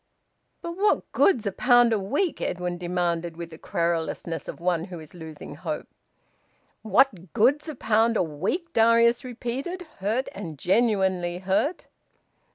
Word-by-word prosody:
"But 340 +1 -5
what 415 +2 +1
good's 245 - +3
a 200 - 0
pound 240 +2 +4
a 215 - +1
week?" 285 - -1
Edwin 180 0 -2
demanded, 175 -2 -1
with 170 -1 -7
the 160 - -11
querulousness 170 -1 -2
of - - -7
one 170 -1 0
who 180 -3 -8
is 155 -2 -13
losing 160 -3 -9
hope. - - -5 0.9
"What 200 - +2
good's 280 +8 +3
a 305 - -5
pound 225 0 +2
a - - +3
week!" 320 - -3
Darius 230 +2 +4
repeated, 255 +9 -4 0.2
hurt 220 +7 0
and 165 -7 -7
genuinely 190 - +1
hurt. 195 - 0
200 Hz, 145 wpm, -25 LUFS, 175-245 Hz, 0.9 s, pound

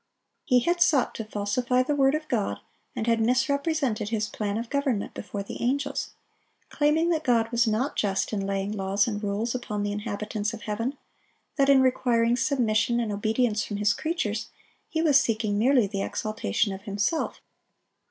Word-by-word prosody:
He 250 -5 +4
had 345 +5 0
sought 285 -8 +3
to 225 - -5
falsify 220 +4 0
the 295 - -1
word 275 0 +3
of 310 0 -4
God, 200 - -1 0.4
and 220 - -2
had 230 -1 +2
misrepresented 260 -2 +1
His 215 -1 -1
plan 205 -1 -3
of 230 +1 -4
government 280 -7 -1
before 200 -1 -5
the - - -8
angels, 275 +3 -1 0.6
claiming 310 +3 +2
that 320 -2 0
God 230 -4 +2
was 235 0 +2
not 225 +6 0
just 195 +1 0
in 195 -2 -1
laying 195 0 -1
laws 200 0 0
and 210 -2 -3
rules 210 +3 -1
upon 215 -5 -3
the 205 - -1
inhabitants 210 +1 -3
of 215 - -12
heaven; 230 +6 -3 0.6
that 275 -1 +3
in 275 -1 +7
requiring 240 -2 +2
submission 240 -3 +1
and 230 -3 -1
obedience 215 +1 0
from 205 - -4
His 205 0 +2
creatures, 225 -10 -2 0.4
He 320 0 -1
was 290 -4 +6
seeking 215 -2 0
merely 250 0 +4
the 195 0 -3
exaltation 210 - -1
of 190 - -8
Himself. 205 +9 -1
230 Hz, 170 wpm, -26 LUFS, 210-265 Hz, 0.6 s, in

